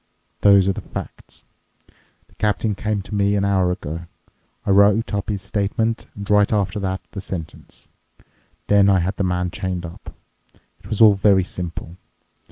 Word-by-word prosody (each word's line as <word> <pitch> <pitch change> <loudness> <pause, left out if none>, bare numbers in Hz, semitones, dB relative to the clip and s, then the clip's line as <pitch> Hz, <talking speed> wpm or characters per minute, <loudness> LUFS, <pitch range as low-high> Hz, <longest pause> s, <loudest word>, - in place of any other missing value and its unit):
Those 100 -2 +5
are 95 - +2
the - - -6
facts. - - -9 0.8
The - - -28
captain 105 0 0
came 105 0 -2
to 105 - -11
me 100 0 +2
an 100 -1 +1
hour 95 -2 +2
ago. 85 0 -5 0.6
I - - +1
wrote 100 +3 +4
up 100 -1 -2
his 100 -2 -3
statement 105 +3 -1
and 100 -1 -7
right 105 -1 +3
after 100 -2 0
that 95 -1 -3
the 100 - -6
sentence. 90 -5 -8 0.8
Then 100 -1 +4
I 95 - +4
had 95 +2 -1
the - - 0
man 90 -1 -1
chained 90 -2 -4
up. 85 - -11 0.6
It - - -15
was 110 - -2
all 110 -2 +8
very 95 -1 +3
simple. 85 -1 -7
100 Hz, 170 wpm, -21 LUFS, 90-105 Hz, 0.8 s, all